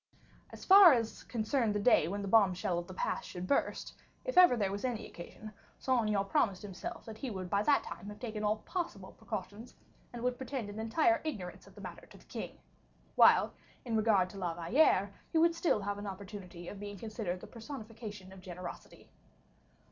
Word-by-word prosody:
As - - -10
far 385 -4 +10
as 230 -3 -1
concerned 225 -1 0
the - - +1
day 200 -7 +4
when 200 +3 -3
the - - -4
bombshell 185 -4 +3
of 175 - -7
the 185 - -8
past - - -2
should 180 0 -5
burst, 275 - 0 0.3
if - - -3
ever 360 -9 +8
there 200 -3 0
were 200 - -3
any 245 -4 -2
occasion, 215 +5 -10 0.2
Saint 245 -5 +1
Aignan 200 -2 +1
promised 195 -1 +1
himself 195 -3 -7
that 220 -1 -9
he 265 - -3
would 185 -4 -6
by 200 - +3
that 285 +6 +3
time 200 - -8
have 210 0 -9
taken 215 -2 -4
all 210 0 +2
possible 330 - -4
precautions, 220 +1 -7 0.4
and 240 -1 -7
would 250 0 0
pretend 260 -5 -4
an 210 - -7
entire 310 +9 +2
ignorance 205 - -5
of - - -17
the - - -11
matter - - -9
to - - -15
the - - -20
king; - - -7 0.6
while, - - +6 0.3
with 235 - -3
regard 215 -4 +3
to 200 - -9
La 175 -3 -2
Valliere, 195 - +3 0.2
he 330 - +1
would 335 +1 +5
still 335 -10 +1
have 200 +1 -3
an 205 - -6
opportunity 190 -3 -8
of 200 - -7
being 205 0 -7
considered 215 -3 -4
the - - -10
personification 220 -5 -9
of 190 - -12
generosity. 180 -1 -9
210 Hz, 200 wpm, -33 LUFS, 190-240 Hz, 0.6 s, far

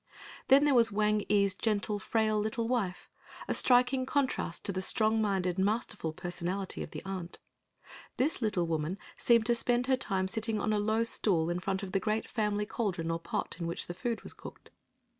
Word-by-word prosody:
Then 275 +2 +6
there 290 - +4
was 230 -3 +5
Wang 210 0 +1
ee's 200 -2 +3
gentle 210 0 -1
frail 215 +1 +1
little 220 +2 -2
wife, 215 -7 -2 0.4
a - - 0
striking 255 +1 +3
contrast 265 -12 -1
to - - 0
the 185 -1 -3
strong 220 +2 +2
minded, 190 -3 0
masterful 205 -4 -1
personality 175 +3 -4
of - - -5
the - - -8
aunt. 185 -3 -5 0.8
This 270 +2 +1
little 205 -6 0
woman 165 +2 -2 0.2
seemed 235 -2 +3
to 240 - +3
spend 240 +1 +2
her 260 0 +2
time 190 -6 -1
sitting 220 +2 0
on 215 +1 0
a 210 - +1
low 220 +2 +1
stool 175 -7 +2
in 175 - -1
front 190 +1 -2
of 190 - -6
the 195 - +1
great 215 +3 -1
family 210 -2 -1
caldron 180 -7 -2
or 165 - -2
pot 165 - -4
in 170 - -3
which 170 - -3
the 175 - -6
food 235 +4 -3
was - - -6
cooked. - - -12
210 Hz, 195 wpm, -31 LUFS, 185-230 Hz, 0.8 s, Then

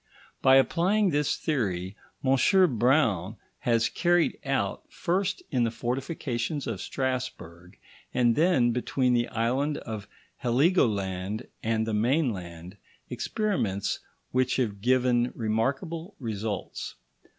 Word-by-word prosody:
By 130 0 +6
applying 185 +8 +3
this 145 -1 +1
theory, 100 - -2 0.3
M. 135 - +4
Braun 115 - +2 0.2
has 115 -1 +2
carried 175 -1 +1
out, 130 -8 -1
first 190 +3 -1
in 125 -4 +2
the 115 - +2
fortifications 125 +3 -3
of 110 -5 -4
Strasburg, 95 -9 -4 0.3
and 120 -2 +3
then 150 -8 +3
between 125 +1 +1
the 120 0 +2
island 130 +6 0
of 110 -3 -6 0.3
Heligoland 110 - +1 0.2
and 110 0 0
the 110 - -2
mainland, 105 - -1 0.3
experiments 175 - -1 0.3
which 130 0 +1
have 105 -6 -1
given 125 0 +2
remarkable 135 - -2
results. 110 -4 -4
120 Hz, 105 wpm, -27 LUFS, 110-140 Hz, 0.3 s, By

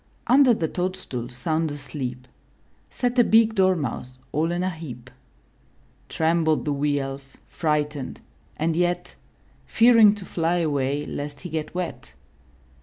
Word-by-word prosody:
Under 255 -1 +5
the 165 - -1
toadstool 180 -10 -4
sound 155 +6 -1
asleep. 135 -3 -6 0.6
Sat 245 0 -1
a - - +8
big 225 0 +4
Dormouse 160 - 0
all 160 +3 0
in 175 +1 -1
a 185 - +1
heap. 130 -7 -9 1.0
Trembled 160 -1 +1
the 150 - 0
wee 145 +1 0
Elf, 135 0 -6
frightened, 150 -3 -2 0.4
and 160 +1 0
yet 175 +1 0 0.5
Fearing 225 -3 +6
to 200 -3 -9
fly 170 0 0
away 145 -3 0
lest 145 0 -6
he 180 - -7
get 155 +1 -4
wet. 180 -2 -5
160 Hz, 130 wpm, -24 LUFS, 140-180 Hz, 1.0 s, a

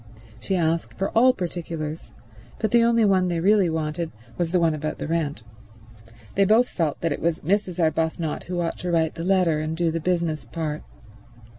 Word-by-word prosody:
She 190 - -2
asked 165 -1 0
for 195 +2 -1
all 250 +3 +6
particulars, 165 -6 -5 0.5
but 220 - -1
the 235 0 +5
only 230 -1 +4
one 190 -2 +3
they 170 -2 -1
really 195 0 +4
wanted 160 +1 -2 0.2
was 170 -2 -1
the 180 - +3
one 165 -2 +3
about 155 0 -3
the - - -4
rent. 155 -6 -2 0.9
They 200 - +3
both 220 +5 +4
felt 160 -5 -2
that 165 - 0
it - - -6
was 165 -1 0
Mrs. 185 +1 0
Arbuthnot 160 -1 0
who 175 0 -2
ought 165 - -3
to 180 - -3
write 165 -2 +1
the 165 - -6
letter 180 -4 +2
and 155 +1 -3
do 170 -1 +1
the 165 - -2
business 170 -2 -1
part. 155 -3 -4
170 Hz, 190 wpm, -24 LUFS, 160-185 Hz, 0.9 s, all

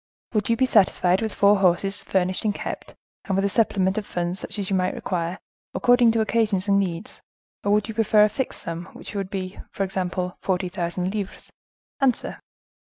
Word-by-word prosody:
"Would 215 -1 0
you 230 - +3
be 260 - +4
satisfied 190 -5 +3
with 220 -1 -1
four 200 0 +4
horses 195 +2 +2
furnished 185 -1 0
and 210 -2 0
kept, - - -6 0.3
and 195 - -1
with 195 +1 +2
a - - +2
supplement 195 -2 +2
of 210 - -8
funds 175 +1 -2
such - - -5
as 200 -1 -3
you - - +3
might 185 0 0
require, 175 0 -2 0.4
according 245 -1 +5
to 225 - +2
occasions 215 -3 +1
and 200 0 +4
needs, 175 -4 -3 0.4
or 205 - +1
would 210 0 +2
you 220 - -5
prefer 215 -1 +4
a 210 - +4
fixed 265 +4 -3
sum 170 0 -5
which - - -10
would 195 -2 -3
be, 190 -1 -5
for 195 - -2
example, 185 -1 -2
forty 185 -1 -1
thousand 180 +1 -2
livres? 205 -3 -5 0.5
Answer." 265 -4 +1
195 Hz, 195 wpm, -24 LUFS, 185-215 Hz, 0.5 s, according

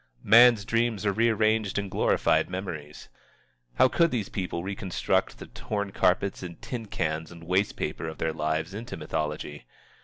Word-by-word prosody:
Man's 115 -1 +7
dreams 115 -2 0
are 100 - +3
rearranged 110 -2 +2
and 100 -2 -2
glorified - - +2
memories. 85 -6 -6 0.7
How 130 - +6
could 170 +5 +3
these 115 -8 -2
people 90 -3 -3
reconstruct 95 -1 -1
the - - -9
torn 100 -2 -4
carpets 95 +1 +1
and 90 -2 -8
tin 115 -4 -6
cans 80 -3 -3
and 85 -1 -12
waste 95 +4 +1
paper - - -3
of 80 - -6
their 80 - -1
lives 80 +3 -2
into 115 -2 -6
mythology? 75 -3 -4
95 Hz, 155 wpm, -27 LUFS, 80-110 Hz, 0.7 s, Man's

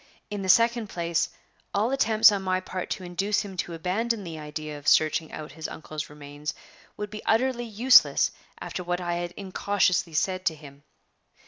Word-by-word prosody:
In 205 -1 -3
the 190 - -3
second 230 +1 +4
place, 170 -1 -1 0.5
all 215 +5 +2
attempts 225 -5 +5
on 200 -1 -1
my 185 -1 0
part 185 -1 -5
to 185 - -3
induce 190 +4 0
him 195 -2 -7
to 170 -1 -3
abandon 205 +6 -1
the 165 -3 -7
idea 150 0 -6
of 145 - -12
searching 155 0 +3
out 150 -2 -7
his 160 +2 -6
uncle's 155 -1 -7
remains 150 0 -7 0.4
would 210 -1 -5
be 215 - -7
utterly 240 +1 +1
useless 235 +4 +5 0.3
after 180 - -5
what 175 0 -1
I 175 -1 -2
had 175 0 -3
incautiously 190 -3 0
said 185 +4 0
to 160 - +1
him. 145 -2 -14
180 Hz, 180 wpm, -26 LUFS, 160-210 Hz, 0.5 s, attempts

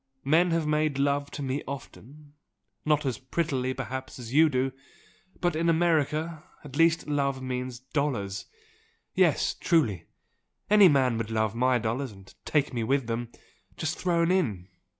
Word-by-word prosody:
Men 165 +5 +4
have 165 -1 +1
made 150 -2 +1
love 140 0 +1
to 145 - -6
me 135 +2 -2
often 140 +1 -10 0.5
not 150 -1 +2
as 130 -4 -2
prettily 130 -2 -1
perhaps 130 0 -5
as 120 -1 -8
you 160 +2 +6
do! 130 -1 0 0.7
but 175 -3 0
in 165 +1 +1
America 160 -1 +1 0.2
at 145 -3 -10
least 165 +1 +3
love 140 -2 0
means 125 -1 -4
dollars! 130 -7 -3 0.7
Yes, - - +3
truly! 115 - +1 0.6
Any 210 -2 +8
man 130 -5 +2
would 115 -1 -3
love 110 -1 0
my 125 +2 +2
dollars, 120 +3 -2
and 95 -1 -15
take 145 -3 +1
me 120 -2 -1
with 135 +2 +1
them, 115 +1 -3 0.5
just 160 +1 -2
thrown 170 -1 +1
in! 105 - 0
140 Hz, 150 wpm, -27 LUFS, 125-155 Hz, 0.7 s, Any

